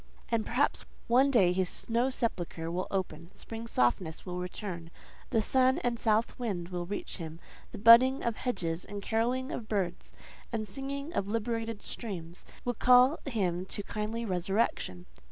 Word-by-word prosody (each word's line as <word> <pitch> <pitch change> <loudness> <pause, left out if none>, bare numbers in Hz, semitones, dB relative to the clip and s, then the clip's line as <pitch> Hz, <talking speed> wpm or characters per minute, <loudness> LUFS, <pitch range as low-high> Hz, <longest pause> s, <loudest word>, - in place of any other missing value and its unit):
And, 230 -2 0
perhaps, 260 +5 +1 0.2
one 255 +4 +5
day 195 -9 +4
his 185 -1 0
snow 235 +3 +1
sepulchre 175 -10 -2
will 180 +2 -2
open, 170 -4 -3
spring's 230 0 -7
softness 160 - +1
will 180 -1 -4
return, 180 -2 -5 0.4
the 220 - +2
sun 260 +2 +3
and 240 -1 0
south 225 +3 +1
wind 190 -8 -3
will 175 -1 -4
reach 205 - -5
him; 165 -2 -7 0.3
the - - -7
budding 235 +5 +7
of 235 -2 -1
hedges, 180 -9 -2
and 205 -1 -7
carolling 245 +5 0
of 225 - -5
birds, 185 -4 -2 0.4
and 220 -2 -2
singing 275 - -5
of 195 - -1
liberated 225 0 -2
streams, 175 -7 -6 0.2
will 245 - +1
call 250 +5 +5
him 185 -9 0
to 205 - -4
kindly 220 +3 -3
resurrection. 180 - -1
215 Hz, 155 wpm, -30 LUFS, 180-240 Hz, 0.4 s, budding